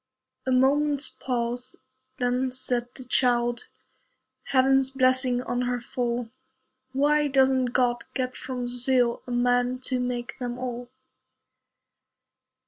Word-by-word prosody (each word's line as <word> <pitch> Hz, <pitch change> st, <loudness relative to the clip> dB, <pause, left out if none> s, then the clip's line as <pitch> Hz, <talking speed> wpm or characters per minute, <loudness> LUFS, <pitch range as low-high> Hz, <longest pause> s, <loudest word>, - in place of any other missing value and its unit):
A -, -, +1 dB
moment's 280 Hz, +3 st, +3 dB
pause. 245 Hz, 0 st, -2 dB, 0.4 s
Then 250 Hz, +1 st, 0 dB
said 250 Hz, -1 st, +1 dB
the 260 Hz, -, -8 dB
child, 240 Hz, -, +2 dB, 0.8 s
Heaven's 270 Hz, 0 st, +3 dB
blessing 255 Hz, -1 st, +2 dB
on 245 Hz, 0 st, -2 dB
her 245 Hz, 0 st, -1 dB
fall, 240 Hz, -1 st, -3 dB, 0.6 s
"Why 295 Hz, +2 st, +2 dB
doesn't 265 Hz, -1 st, +3 dB
God 240 Hz, -1 st, 0 dB
get 255 Hz, -1 st, -2 dB
from 255 Hz, -1 st, -5 dB
Brazil 245 Hz, 0 st, +1 dB
A -, -, -6 dB
man 245 Hz, +1 st, +2 dB
to 255 Hz, -1 st, -1 dB
make 245 Hz, 0 st, -4 dB
them 245 Hz, -1 st, -4 dB
all?" 245 Hz, -1 st, -5 dB
250 Hz, 115 wpm, -26 LUFS, 245-260 Hz, 0.8 s, moment's